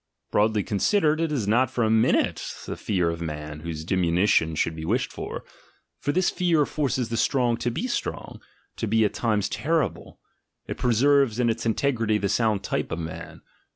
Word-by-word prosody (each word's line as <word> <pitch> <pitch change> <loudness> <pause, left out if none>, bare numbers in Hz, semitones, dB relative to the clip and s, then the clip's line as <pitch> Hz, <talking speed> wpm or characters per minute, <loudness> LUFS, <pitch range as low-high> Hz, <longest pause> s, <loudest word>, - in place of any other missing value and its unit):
Broadly 105 0 +2
considered, 155 - +1
it 165 -2 0
is 125 -9 -1
not 120 +4 +3
for 125 -2 -1
a 110 - +2
min 110 0 +4
ute - - 0 0.2
the - - -4
fear 90 -5 0
of 85 0 -6
man, 75 -1 -5
whose 80 -1 -6
diminution 85 -2 +2
should 80 +1 0
be 80 - -6
wished 115 +10 -1
for; - - -6 0.6
for 145 - -1
this 185 +3 +2
fear 165 -5 +2
forces 130 -6 -1
the 115 - -2
strong 120 -1 +2
to 120 - -1
be 120 - -3
strong, 245 - -4 0.4
to 115 - -2
be 110 +1 +3
at 105 - -1
times 105 -4 0
terrible— 155 -6 -2 0.5
it - - -5
preserves 125 0 +3
in 120 -2 +3
its 115 +1 -3
integrity 115 -2 +1
the 100 -2 -1
sound 110 -3 +1
type - - -2
of 85 - -2
man. 80 -1 -7
110 Hz, 190 wpm, -25 LUFS, 95-130 Hz, 0.6 s, min